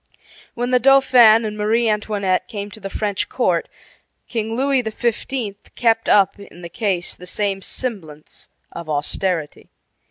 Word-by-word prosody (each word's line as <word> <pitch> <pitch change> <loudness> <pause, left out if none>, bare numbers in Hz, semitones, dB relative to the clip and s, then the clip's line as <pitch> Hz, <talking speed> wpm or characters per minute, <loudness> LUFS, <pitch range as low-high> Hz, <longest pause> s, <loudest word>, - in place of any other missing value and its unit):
When 245 +1 -2
the 250 - +4
Dauphin 245 -4 +6
and 210 -1 -4
Marie 220 +3 +1
Antoinette 205 -3 0
came 205 -3 -6
to 215 - -10
the 195 -1 -6
French 205 -1 -2
court - - 0 0.6
King 225 -1 -3
Louis 270 +1 +2
XV. 225 -1 -3 0.2
kept 225 -1 +1
up 195 -1 +4
in 180 -3 -13
the 170 - -7
case 185 -2 -2
the 180 - -12
same 195 0 -1
semblance 170 - -6 0.2
of 170 -2 -8
austerity. 155 +2 -2
210 Hz, 140 wpm, -20 LUFS, 190-235 Hz, 0.6 s, Dauphin